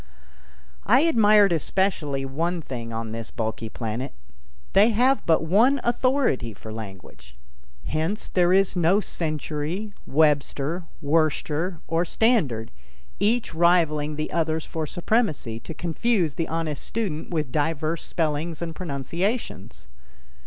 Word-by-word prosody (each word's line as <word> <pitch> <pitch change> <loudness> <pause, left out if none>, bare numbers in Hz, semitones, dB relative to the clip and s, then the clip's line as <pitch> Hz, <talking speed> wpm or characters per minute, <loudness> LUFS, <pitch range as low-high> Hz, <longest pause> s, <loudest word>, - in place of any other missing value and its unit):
I - - +6
admired 215 - +5
especially 160 -5 0
one 165 +6 -1
thing 120 -6 -6
on 115 -1 -4
this 115 0 -5
bulky 110 0 -4
planet. 115 - -4 0.6
They 205 +4 +6
have 250 +5 +3
but 160 -1 +4
one 225 - +4
authority 240 - +1
for 110 +2 -9
language. 90 -11 -10 0.5
Hence 160 +7 -1
there 175 -1 +2
is 195 0 +4
no 175 +3 +4
Century, 160 +3 -3
Webster, 150 +2 +1 0.2
Worcester 155 +3 0
or 165 +1 +1
Standard, 165 - +1 0.5
each 225 -2 +1
rivaling 160 -3 +2
the 155 +1 -3
others 160 -1 0
for 160 -1 -4
supremacy, 165 - 0
to 165 - -8
confuse 175 - 0
the 165 - -2
honest 160 -3 -3
student 190 -9 -3
with 155 -7 -2
diverse 155 +2 -1
spellings 160 0 -2
and 170 -1 -4
pronunciations. 175 - -3
160 Hz, 120 wpm, -24 LUFS, 145-190 Hz, 0.6 s, I